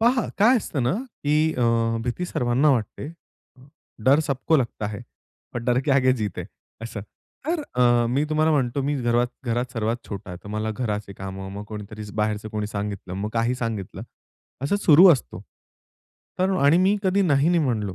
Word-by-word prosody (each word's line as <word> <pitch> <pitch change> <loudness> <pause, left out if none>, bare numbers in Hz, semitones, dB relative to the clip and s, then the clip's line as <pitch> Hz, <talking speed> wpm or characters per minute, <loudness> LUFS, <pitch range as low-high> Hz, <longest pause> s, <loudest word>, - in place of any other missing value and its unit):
पहा 240 +1 +3
काय 230 +6 +6
असतं 150 - -2
ना, 125 - +1 0.3
की 155 +2 +2
अ, - - +1 0.4
भीती 125 +9 -2
सर्वांना 130 -1 +2
वाटते, 125 +2 -2 1.0
डर 140 +4 +5
सबको 150 +1 +1
लगता 115 -5 -2
है 105 -2 -7 0.5
और 120 - -2
डर 125 +1 +2
के 140 - -2
आगे 130 -1 +4
जीत 105 -6 -3
है - - -4 0.4
असं. 115 -2 -6 0.5
तर 330 0 0 0.2
अ, 120 -1 +4
मी 140 +4 +1
तुम्हाला 155 +1 +2
म्हणतो, 135 -1 0
मी 145 +2 0
घरात 120 +1 +2 0.2
घरात 120 +1 -2
सर्वात 115 0 -2
छोटा 100 -3 -7
आहे. 90 - -7
तर - - -9
मला 110 +1 -2
घराचे 105 -3 -3
कामं, 95 0 -7
मग 105 - -6
कोणीतरी 105 0 -8
बाहेरचं 105 0 -1
कोणी 105 -1 -3
सांगितलं. 100 -3 -5
मग 100 +2 -3
काही 115 +2 +1
सांगितलं. 115 -6 -4 0.6
असं 145 +9 +1
सुरु 180 -2 +7
असतो. 120 - -4 1.0
तर 185 +1 +2
आणि 150 +5 +6
मी 190 +3 +3
कधी 195 +1 +2
नाही, 145 -4 +3
नाही 175 0 +3
म्हणलो. 105 -7 -1
120 Hz, 175 wpm, -24 LUFS, 105-150 Hz, 1.0 s, सुरु